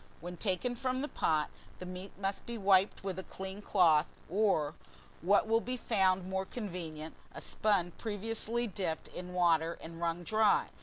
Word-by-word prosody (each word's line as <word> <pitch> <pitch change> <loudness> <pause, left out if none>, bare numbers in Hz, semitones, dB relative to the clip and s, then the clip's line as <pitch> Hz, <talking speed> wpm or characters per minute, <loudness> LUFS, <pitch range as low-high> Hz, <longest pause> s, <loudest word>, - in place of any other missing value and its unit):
WHEN 175 +2 -6
TAKEN 195 +6 0
FROM 255 +1 -1
THE 290 - -1
POT, 155 - +1 0.3
the 180 - -7
meat 185 +2 -7
must 195 0 -2
be 235 0 -4
wiped 195 -1 +3
with 190 -1 -3
a - - -5
clean 190 +2 -7
cloth, 165 -7 +4 0.2
or, 185 -7 +2 0.5
what 200 +5 +4
will 225 +1 +3
be 255 +2 -3
found 190 -5 +2
more 190 0 -1
convenient, 170 -8 -5 0.2
a - - -5
sponge 190 -5 +1
previously 225 +2 -1
dipped 185 -6 -2
in 180 0 -7
water 170 -2 +3
and 165 +1 -9
wrung 170 +1 -1
dry. 215 +2 +3
190 Hz, 165 wpm, -33 LUFS, 175-215 Hz, 0.5 s, cloth